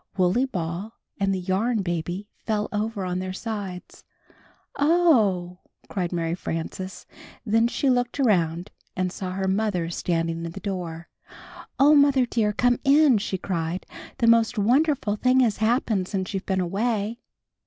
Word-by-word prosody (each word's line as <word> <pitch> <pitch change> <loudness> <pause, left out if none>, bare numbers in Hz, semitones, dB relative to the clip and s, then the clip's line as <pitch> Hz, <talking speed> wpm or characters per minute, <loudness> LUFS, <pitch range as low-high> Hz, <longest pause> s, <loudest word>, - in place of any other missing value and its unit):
Wooley 185 +8 +3
Ball 185 0 -5 0.2
and 195 0 +1
the 190 - 0
Yarn 200 +5 0
Baby 175 +3 -3
fell 210 -1 -2
over 210 -1 -2
on 180 0 -2
their 185 0 -4
sides. 200 -4 -6 0.8
"Oh!" 225 - +3 0.3
cried 180 -3 -2
Mary 165 -2 -1
Frances; 180 +2 -5 0.4
then 225 +1 +3
she 275 - -1
looked 245 +1 +1
around 175 -7 +1 0.2
and 185 -1 -1
saw 185 -1 -5
her 190 0 -2
mother 190 -4 0
standing 165 -1 -1
in 165 0 -5
the - - -7
door. 175 -4 -5 0.7
"Oh, 285 +3 +7
Mother 280 -3 +5
dear, 225 -3 0
come 245 +3 +2
in," 280 -4 +5
she 200 -1 -3
cried. 175 -1 -3 0.3
"The 235 - +1
most 230 0 +4
wonderful 245 0 +2
thing 255 +3 +3
has 225 -5 +2
happened 220 -4 +1
since 190 -1 -3
you've 195 -1 -4
been 190 -1 +1
away!" 215 +4 -1
200 Hz, 150 wpm, -25 LUFS, 180-235 Hz, 0.8 s, Oh